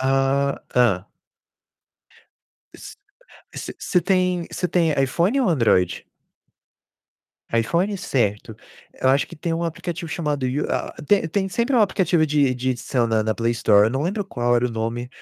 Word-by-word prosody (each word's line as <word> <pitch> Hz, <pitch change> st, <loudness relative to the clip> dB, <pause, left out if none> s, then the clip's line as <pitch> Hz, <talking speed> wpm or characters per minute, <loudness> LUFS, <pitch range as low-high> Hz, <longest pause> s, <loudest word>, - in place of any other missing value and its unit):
Ah, 135 Hz, +1 st, +1 dB
tá. 105 Hz, -6 st, +2 dB, 1.7 s
S -, -, -11 dB, 0.6 s
você -, -, -6 dB
você 180 Hz, -, +1 dB
tem 180 Hz, -1 st, +1 dB
você 180 Hz, -, -2 dB
tem 165 Hz, -3 st, +2 dB
iPhone 175 Hz, -, +1 dB
ou 245 Hz, -, +2 dB
Android? 110 Hz, -, +2 dB, 1.5 s
iPhone, 170 Hz, -, +1 dB
certo. 110 Hz, -, -2 dB, 0.4 s
Eu 130 Hz, -, +2 dB
acho 135 Hz, +2 st, +3 dB
que 170 Hz, -, -12 dB
tem 165 Hz, +2 st, -2 dB
um 170 Hz, -, -3 dB
aplicativo 170 Hz, +1 st, -4 dB
chamado 150 Hz, -4 st, -2 dB
U 130 Hz, +3 st, -1 dB
a -, -, -2 dB
tem 200 Hz, -5 st, +3 dB
tem 190 Hz, +3 st, -1 dB
sempre 235 Hz, +7 st, 0 dB
um -, -, +5 dB
aplicativo 180 Hz, -5 st, +2 dB
de 140 Hz, -3 st, +2 dB
de 130 Hz, +1 st, -1 dB
edição 120 Hz, -1 st, -1 dB
na 110 Hz, -1 st, +1 dB
na 110 Hz, 0 st, -1 dB
Play 115 Hz, 0 st, 0 dB
Store, 105 Hz, -2 st, +4 dB
eu 110 Hz, -, 0 dB
não 135 Hz, +3 st, -2 dB
lembro 200 Hz, +4 st, -2 dB
qual 120 Hz, -4 st, 0 dB
era 125 Hz, +1 st, +1 dB
o -, -, -5 dB
nome, 115 Hz, +2 st, -3 dB
140 Hz, 160 wpm, -22 LUFS, 120-175 Hz, 1.7 s, um